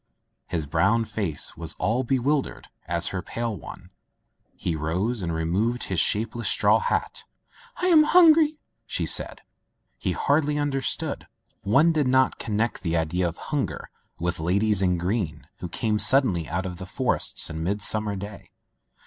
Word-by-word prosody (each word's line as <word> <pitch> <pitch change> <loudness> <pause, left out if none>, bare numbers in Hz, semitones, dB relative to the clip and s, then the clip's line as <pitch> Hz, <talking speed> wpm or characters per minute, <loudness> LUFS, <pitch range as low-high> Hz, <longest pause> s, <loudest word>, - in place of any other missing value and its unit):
His 85 -4 -3
brown 85 +10 +1
face 100 -8 -1
was 85 -1 -6
as 120 +4 0
bewildered 135 +2 -1 0.2
as 85 0 0
her 95 - -4
pale 115 +1 -4
one. 85 - -11 0.6
He 85 - -3
rose 90 +10 -2
and 85 -2 -2
removed 95 +10 -1
his 95 -3 -1
shapeless 115 +5 +1
straw - - +3
hat. 485 +1 -2 0.6
"I - - +3
am 320 -4 +6
hungry/' 315 -3 +5 0.3
said - - 0 0.6
she. - - -2
He - - +2
hardly 150 +1 +1
understood. 140 -2 -2 0.3
One 135 +12 +4
did 150 -4 +1
not 130 0 +2
con 105 -2 -3
nect 115 +2 -1
the 85 -2 -1
idea 85 +3 0
of 85 - -6 0.2
hunger - - -3 0.3
with 90 0 -2
ladies 100 +5 +1
in 90 -2 +2
green 90 -4 -3
who 90 - -6
came 110 +1 -1
suddenly 105 - +4
out 90 +2 -2
of 90 -1 -6
forests 130 +5 +1
on 80 0 -5
mid 100 +5 -2
summer 105 -1 0
day. 100 +1 -9
105 Hz, 155 wpm, -25 LUFS, 85-130 Hz, 0.6 s, am